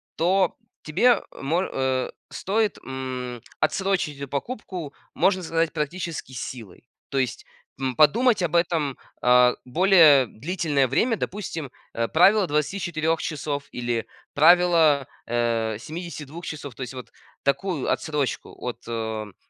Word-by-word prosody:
то 180 +2 +2 0.3
тебе 235 +9 +3
мо 165 +7 -1
э, 130 -1 -1 0.2
стоит, 210 +2 -1
м, 130 -2 -5 0.2
отсрочить 170 -2 0
эту 140 0 -6
покупку, 170 - -5 0.2
можно 185 -2 +2
сказать, 165 0 0
практически 160 -2 -4
силой. 120 -3 -8 0.2
То 140 - -3
есть, 125 -2 -2 0.4
м, 130 -2 -2
подумать 220 - +4
об 170 -1 -1
этом, 165 -5 +1 0.2
а, 125 0 +5
более 160 -2 +6
длительное 145 - 0
время, 225 - +1
допустим, 165 -10 -5 0.2
э, 115 0 -1
правило 195 +4 +5
24 160 +1 0
часов 145 -2 -3
или 120 -1 -2 0.3
правило, 165 -3 +5 0.2
э, 115 -2 0
72 160 +3 -7
часов- 145 -4 -6
то 130 - -10
есть 125 - -7
вот 125 -1 -9 0.3
такую 155 +1 0
отсрочку 150 -4 -2
от, 125 -1 -6
м, 110 -3 -4
150 Hz, 125 wpm, -24 LUFS, 130-175 Hz, 0.4 s, более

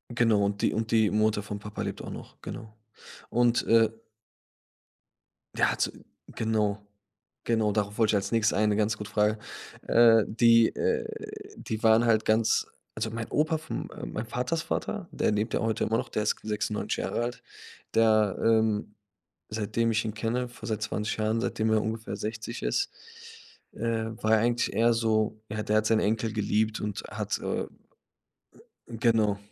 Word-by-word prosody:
Genau 110 -4 +3
und 100 0 -1
die - - +2
und 110 0 -2
die 110 -2 +4
Mutter 110 0 +2
von 105 0 -6
Papa 105 0 -7
lebt - - -4
auch - - -6
noch, - - -10
genau. 110 -1 -8 0.6
Und, 120 0 +2
äh 115 -1 +5 1.7
Der - - +4
hat - - -4
so - - +1 0.4
Genau. 105 -2 0 0.6
Genau, 110 -3 +1
darauf 105 0 -1
wollte 110 -2 +3
ich 105 - +2
als 100 - -1
Nächstes 115 -1 +2
ein 105 0 +3
'ne 105 - +2
ganz 105 +1 +1
gute 105 0 -7
Frage. 105 0 +2 0.5
Äh, 115 -2 +6
die, 115 0 +5
äh 460 +1 0 0.5
die 110 -1 -5
waren 110 +1 +5
halt 110 -2 +3
ganz 110 +1 +2 0.3
also, 110 - -3
mein 115 0 -5
Opa 155 +1 +2
von, 155 - -6
äh - - -7
mein 110 - -4
Vaters 125 +8 -1
Vater, 190 +2 -3
der - - +1
lebt 105 +2 -1
ja - - +1
auch 115 - 0
heute 110 - 0
immer 110 - +1
noch, - - -3
der 105 - -1
ist 105 - +1
96 105 0 -2
Jahre - - -2
alt, 120 +1 -5 0.5
der, 110 -3 +4
ähm 110 -2 +2 0.5
seitdem 110 +2 0
ich 110 +1 0
ihn 110 - -3
kenne, 120 +3 -1
vor 110 -2 -10
seit 110 -2 -2
20 105 0 -2
Jahren, 110 +1 0
seitdem 110 -1 0
er 110 -1 +3
ungefähr 110 -2 -4
60 110 +3 -5
ist, 395 - 0 0.8
äh, - - -11 0.4
war 110 +1 +3
er 110 - +5
eigentlich 120 +2 +1
eher 115 +1 +4
so 110 -1 0
ja, 105 0 -3
der 105 0 +2
hat 110 - +1
seinen 110 -1 +3
Enkel 110 +2 0
geliebt 110 +1 0
und 105 0 -4
hat, 105 -1 -3
äh - - -2 1.2
Genau, 115 -3 +2
110 Hz, 175 wpm, -28 LUFS, 105-115 Hz, 1.7 s, Äh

